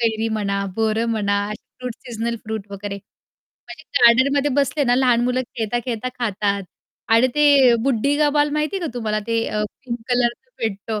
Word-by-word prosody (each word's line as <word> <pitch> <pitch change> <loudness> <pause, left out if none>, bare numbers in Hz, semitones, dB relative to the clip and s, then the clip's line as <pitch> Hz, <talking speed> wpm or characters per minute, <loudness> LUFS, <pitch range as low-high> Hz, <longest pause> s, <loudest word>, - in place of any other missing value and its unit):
कैरी 225 -1 0
म्हणा, 200 -2 -1
बोरं 220 0 +1
म्हणा, 200 -2 +1
असे 215 - -10 0.2
फ्रूट 250 -2 -5
सीजनल 235 0 -3
फ्रूट 220 -2 -5
वगैरे. 200 0 -5
म्हणजे 200 +9 -17 0.2
गार्डनमध्ये 275 +4 +4
बसले 285 +1 0
ना 245 -1 +3
लहान 250 -2 +3
मुलं 250 +1 +1 0.2
खेळता-खेळता 240 +1 -2
खातात 205 -3 -1 0.5
आणि 230 +3 +5
ते 285 -4 +6
बुढ्ढी 275 +2 +1
का 300 -1 +4
बाल 295 0 +3
माहितीये 305 +6 -1
का 340 - -2
तुम्हाला? 215 -3 -1
ते 230 0 0
अ, 210 - -1 0.2
पिंक 240 -2 -4
कलरच 245 - 0
भेटतो, 215 0 -3
235 Hz, 165 wpm, -21 LUFS, 215-260 Hz, 0.5 s, ते